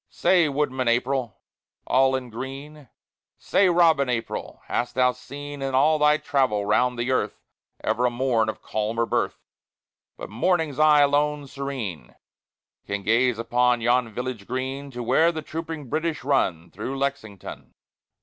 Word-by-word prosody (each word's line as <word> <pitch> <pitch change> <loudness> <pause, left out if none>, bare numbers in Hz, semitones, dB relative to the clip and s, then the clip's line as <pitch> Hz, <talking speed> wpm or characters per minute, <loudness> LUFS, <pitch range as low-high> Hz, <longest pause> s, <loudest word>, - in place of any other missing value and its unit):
Say, 175 -3 +3
Woodman 135 -3 -1
April! 125 +1 0 0.5
all 130 0 +3
in 125 -2 -5
green, 135 +3 -8 0.5
Say, 195 -2 +2
Robin 165 -6 +4
April! 115 -2 -4
hast 120 - -2
thou 125 0 +4
seen 140 +3 -9
In 135 -1 -2
all 150 +3 +4
thy 150 0 +4
travel 130 -10 0
round 125 +4 +2
the 120 +2 -1
earth 130 - -1 0.4
Ever 125 +2 +1
a - - +2
morn 120 -3 +1
of - - -6
calmer 110 +2 -1
birth? - - -2 0.7
But - - -8
Morning's 155 - 0
eye 155 -1 +6
alone 145 +1 +2
serene 130 - -6 0.7
Can 100 0 -3
gaze 120 +2 +2
across 120 +1 +2
yon 120 0 +2
village 125 -2 -5
green 130 +3 -4
To 125 -2 -6
where 155 +8 +3
the 160 -2 -6
trooping 160 -2 -6
British 160 +3 -2
run 90 - 0
Through 130 +8 -5
Lexington. 135 -8 -5
130 Hz, 145 wpm, -24 LUFS, 120-145 Hz, 0.7 s, eye